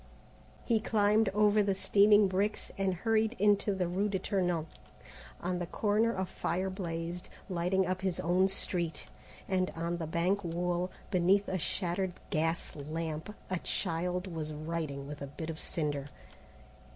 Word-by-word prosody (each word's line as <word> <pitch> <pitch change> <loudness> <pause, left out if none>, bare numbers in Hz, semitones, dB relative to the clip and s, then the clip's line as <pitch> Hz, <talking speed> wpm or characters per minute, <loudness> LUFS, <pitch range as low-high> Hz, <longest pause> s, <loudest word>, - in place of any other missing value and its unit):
He 230 -2 +3
climbed 210 0 +3
over 210 +1 +4
the 200 -1 +1
steaming 205 +1 +5
bricks 195 +3 -1
and 195 -1 0
hurried 220 +4 +1
into 205 0 +3
the 180 -2 0
rue 195 +4 0
de 195 - 0
Tournon. 180 -4 0 0.8
On 180 0 -1
the 175 - -3
corner 215 +4 +2
a 190 - 0
fire 185 +1 -2
blazed, 170 -1 -4 0.2
lighting 185 +1 +1
up 185 +1 -1
his 190 -2 -1
own 180 +3 +3
street, 175 -4 -2 0.4
and 185 -1 +1
on 170 +1 -2
the 165 -2 -4
bank 180 +5 +1
wall, 175 +1 -1 0.2
beneath 190 +3 +3
a 185 - -1
shattered 180 +2 0 0.2
gas 165 +2 0
lamp, 160 +5 -4 0.2
a 185 - 0
child 180 +3 -1
was 160 -4 -4
writing 155 -2 -3
with 145 0 -7
a 140 - -4
bit 160 +4 -5
of 160 - -8
cinder. 145 -3 -2
180 Hz, 150 wpm, -32 LUFS, 165-200 Hz, 0.8 s, steaming